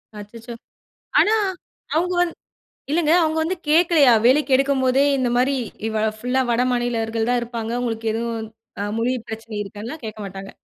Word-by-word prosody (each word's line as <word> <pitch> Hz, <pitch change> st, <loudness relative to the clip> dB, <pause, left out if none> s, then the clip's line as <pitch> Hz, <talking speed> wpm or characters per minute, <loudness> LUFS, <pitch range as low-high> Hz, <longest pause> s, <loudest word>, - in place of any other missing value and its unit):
அச்சச்சோ! 230 Hz, +3 st, -9 dB, 0.7 s
ஆனா 435 Hz, -, +4 dB, 0.6 s
அவுங்க 360 Hz, +3 st, +1 dB
வந் 350 Hz, -1 st, +1 dB, 0.6 s
இல்லங்க 315 Hz, 0 st, +3 dB
அவுங்க 315 Hz, 0 st, +1 dB
வந்து 365 Hz, +4 st, -1 dB
கேட்கலயா! 315 Hz, -4 st, +5 dB
வேலைக்கு 270 Hz, +2 st, +4 dB
எடுக்கும் 275 Hz, 0 st, +1 dB
போதே 260 Hz, +2 st, +3 dB
இந்தமாரி 255 Hz, +2 st, +1 dB, 0.3 s
இவ 220 Hz, -1 st, -1 dB, 0.2 s
ஃபுல்லா 250 Hz, +3 st, 0 dB
வடமாநிலர்கள் 235 Hz, -2 st, 0 dB
தான் 245 Hz, 0 st, +2 dB
இருப்பாங்க. 230 Hz, -1 st, -4 dB
உங்களுக்கு 225 Hz, -2 st, -2 dB
எதுவும் 230 Hz, -1 st, -3 dB, 0.3 s
அ -, -, -1 dB, 0.2 s
மொழி 245 Hz, +2 st, +1 dB
பிரச்சனை 225 Hz, 0 st, -7 dB
இருக்கான்லாம் 215 Hz, +9 st, -8 dB
கேட்க 215 Hz, 0 st, -7 dB
மாட்டாங்க. 195 Hz, 0 st, -8 dB
245 Hz, 140 wpm, -22 LUFS, 225-275 Hz, 0.7 s, கேட்கலயா